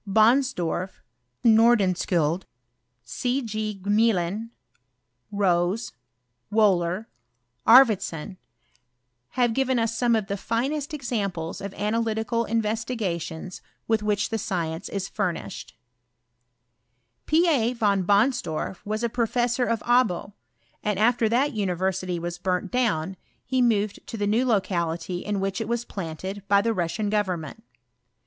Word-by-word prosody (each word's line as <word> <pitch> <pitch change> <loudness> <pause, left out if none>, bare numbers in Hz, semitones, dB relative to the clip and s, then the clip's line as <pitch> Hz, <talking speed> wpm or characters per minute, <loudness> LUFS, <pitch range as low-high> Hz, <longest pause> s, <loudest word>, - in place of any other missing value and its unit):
Bonsdorf, 215 -5 +2 0.4
Nordenskiiild, 190 -7 +3 0.6
C. 245 - -1
G. 215 -2 -4
Gmelin, 210 0 +1 0.8
Rose, 190 +1 +1 0.6
Wbhler, 195 -2 +2 0.6
Arfvedsou, 205 - +5 1.0
have 245 -2 +2
^ivea 260 +1 +1
us 230 0 -2
some 235 0 +2
of 220 -2 0
the 200 +1 -3
finest 275 +8 -2
examples 200 - -3
of 200 0 -5
analytical 225 +2 -1
MveEtigations 210 -6 -2 0.3
with 225 -1 +2
which 210 -1 0
the 225 - -2
science 170 -2 -3
is 195 -1 -3
furnished. 170 -11 -4 0.7
" 120 0 -49
P. 330 +3 +4
A. 245 -8 +2
Von 205 -5 +1
Bonsdorf 200 - +1
was 215 +2 -3
a - - +3
professor 240 +1 0
of 230 -2 -1
Abo, 235 -5 +1 0.5
and 210 -2 0
^fter 225 +1 +3
that 260 +6 +2
university 185 -2 -1
was 170 +1 -5
burnt 185 0 -1
down, 190 -8 0 0.3
he 260 0 +1
moved 215 -4 +1
to 230 - -6
tfae 205 -1 -1
new 235 +5 +2
locality 175 -5 -1
in 205 +1 -2
which 195 +1 -2
it 225 - -3
was 235 +1 -1
planted 190 +2 -6
by 200 0 +5
the 225 +3 +1
Russian 205 +3 -1
government. 190 -3 -2
210 Hz, 120 wpm, -25 LUFS, 180-230 Hz, 1.0 s, Arfvedsou